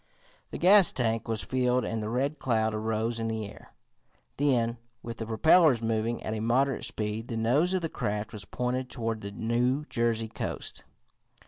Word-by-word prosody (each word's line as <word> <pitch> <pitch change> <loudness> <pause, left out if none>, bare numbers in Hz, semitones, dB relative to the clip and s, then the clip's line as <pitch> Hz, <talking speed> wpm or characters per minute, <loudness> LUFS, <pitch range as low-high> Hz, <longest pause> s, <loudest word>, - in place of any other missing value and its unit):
The - - -6
gas 190 +1 +7
tank 115 -2 -1
was 115 -1 -2
filled 125 -1 +1
and 115 -1 -2
the 105 - -3
Red 140 +5 -1
Cloud 110 -3 +1
arose 110 +2 -1
in 115 - -2
the 110 -1 -2
air. 100 - -12 0.7
Then, 120 -5 +1 0.2
with 115 -1 -6
the 115 - -5
propellers 150 +4 +5
moving 115 +1 -1
at 110 - -3
moderate 130 +4 +1
speed, 110 -1 -3
the 115 - -4
nose 130 +11 +2
of 185 - +1
the 165 - -1
craft 105 -6 -3
was 105 -1 -7
pointed 125 +3 -3
toward 115 -3 -3
the 100 - -5
New 120 +7 0
Jersey 115 -1 0
coast. 110 - -5
115 Hz, 175 wpm, -28 LUFS, 110-130 Hz, 0.7 s, gas